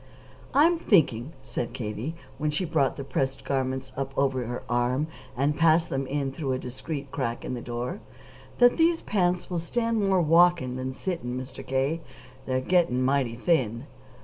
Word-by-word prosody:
"I'm 330 Hz, +4 st, +5 dB
thinking," 150 Hz, -, +3 dB
said 120 Hz, -, -4 dB
Katie, 115 Hz, +7 st, -4 dB, 0.2 s
when 150 Hz, 0 st, 0 dB
she 150 Hz, +5 st, -1 dB
brought 155 Hz, -5 st, +1 dB
the 140 Hz, -, -4 dB
pressed 135 Hz, 0 st, -2 dB
garments 130 Hz, -1 st, -2 dB
up 135 Hz, 0 st, -4 dB
over 130 Hz, -3 st, +1 dB
her 120 Hz, +1 st, -4 dB
arm 125 Hz, +4 st, +1 dB, 0.3 s
and 140 Hz, +3 st, +2 dB
passed 165 Hz, +1 st, +4 dB
them 135 Hz, 0 st, -1 dB
in 140 Hz, 0 st, -1 dB
through 135 Hz, -1 st, -2 dB
a -, -, 0 dB
discreet 135 Hz, +3 st, -6 dB
crack 115 Hz, 0 st, -3 dB
in -, -, -3 dB
the 120 Hz, -, -4 dB
door, 120 Hz, -, -4 dB, 0.6 s
"that 245 Hz, 0 st, +6 dB
these 330 Hz, 0 st, +3 dB
pants 180 Hz, -3 st, 0 dB
will 175 Hz, -, 0 dB
stand 230 Hz, +6 st, 0 dB
more 190 Hz, -1 st, +3 dB
walking 165 Hz, -5 st, +4 dB
than 130 Hz, 0 st, -3 dB
sitting, 130 Hz, -5 st, -3 dB
Mr. 130 Hz, 0 st, -8 dB
K. 135 Hz, +5 st, 0 dB, 0.5 s
They're 130 Hz, 0 st, +1 dB
getting 130 Hz, -5 st, +2 dB
mighty 130 Hz, -3 st, +1 dB
thin." 120 Hz, -4 st, +1 dB
135 Hz, 170 wpm, -27 LUFS, 130-170 Hz, 0.6 s, that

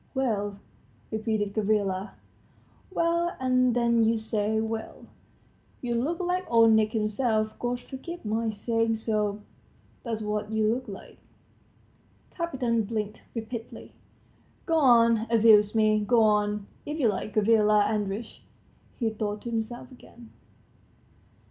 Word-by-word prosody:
"Well?" 205 Hz, -6 st, -1 dB, 0.5 s
repeated 215 Hz, -2 st, -1 dB
Gavrila. 200 Hz, -2 st, 0 dB, 0.8 s
"Well? 340 Hz, -1 st, 0 dB
And 255 Hz, -1 st, +2 dB
then 235 Hz, -1 st, +3 dB
you 225 Hz, +1 st, +2 dB
say 220 Hz, 0 st, -1 dB
well? 220 Hz, 0 st, -5 dB, 0.7 s
You 240 Hz, -2 st, -3 dB
look 280 Hz, +10 st, -1 dB
like 360 Hz, 0 st, -1 dB
Old 230 Hz, -1 st, +6 dB
Nick 220 Hz, -1 st, +3 dB
himself, 215 Hz, 0 st, 0 dB
God 245 Hz, 0 st, -2 dB
forgive 275 Hz, +5 st, -9 dB
my 220 Hz, +2 st, -1 dB
saying 225 Hz, +1 st, 0 dB
so, 210 Hz, -2 st, -1 dB, 0.6 s
that's 225 Hz, -3 st, -4 dB
what 210 Hz, 0 st, -3 dB
you 220 Hz, 0 st, +2 dB
look 255 Hz, +2 st, -5 dB
like." -, -, -10 dB, 1.1 s
Kapiton 250 Hz, -, -1 dB
blinked 215 Hz, -1 st, -4 dB
rapidly. 225 Hz, 0 st, -7 dB, 0.7 s
"Go 330 Hz, -2 st, +1 dB
on 230 Hz, -4 st, +4 dB
abusing 220 Hz, -2 st, +5 dB
me, 215 Hz, -1 st, +4 dB
go 230 Hz, +2 st, +4 dB
on, 210 Hz, -1 st, +1 dB, 0.2 s
if 300 Hz, +2 st, -5 dB
you 255 Hz, -, +3 dB
like, 210 Hz, 0 st, -3 dB
Gavrila 210 Hz, -1 st, +4 dB
Andreitch," 210 Hz, +1 st, -3 dB, 0.6 s
he 225 Hz, -3 st, 0 dB
thought 210 Hz, -1 st, -4 dB
to 235 Hz, -, -5 dB
himself 230 Hz, +3 st, -4 dB
again. 240 Hz, -2 st, -15 dB
225 Hz, 125 wpm, -27 LUFS, 215-240 Hz, 1.1 s, Old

